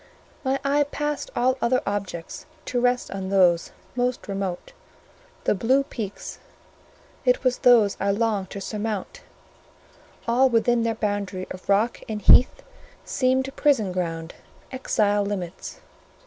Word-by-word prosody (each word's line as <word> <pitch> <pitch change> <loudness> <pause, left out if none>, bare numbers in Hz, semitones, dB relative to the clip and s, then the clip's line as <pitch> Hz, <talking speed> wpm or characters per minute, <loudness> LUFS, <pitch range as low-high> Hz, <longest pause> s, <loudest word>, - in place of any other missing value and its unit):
My 270 0 0
eye 290 +1 +3
passed 295 0 -3
all 255 +2 +1
other 255 +2 +3
objects 200 - -4 0.2
to 245 -1 -1
rest 245 0 +1
on 190 -1 -4
those 180 -3 +3 0.2
most 250 0 -1
remote, 195 - -4 0.7
the - - +2
blue 255 +7 +2
peaks; 215 -7 -7 0.8
it - - +2
was 255 -1 +1
those 230 -5 +5
I 200 - 0
longed 205 -2 0
to 200 - -7
surmount; 215 - -4 1.1
all 255 +3 +4
within 235 0 +2
their 230 -1 0
boundary 205 -3 -2
of 185 +1 -9
rock 210 +4 +2
and 215 -1 -3
heath 245 +5 +5 0.4
seemed 260 +1 0
prison 250 -10 +2
ground, 165 -2 -3 0.4
exile 210 -5 +1
limits. 190 -4 -5
220 Hz, 130 wpm, -24 LUFS, 195-255 Hz, 1.1 s, those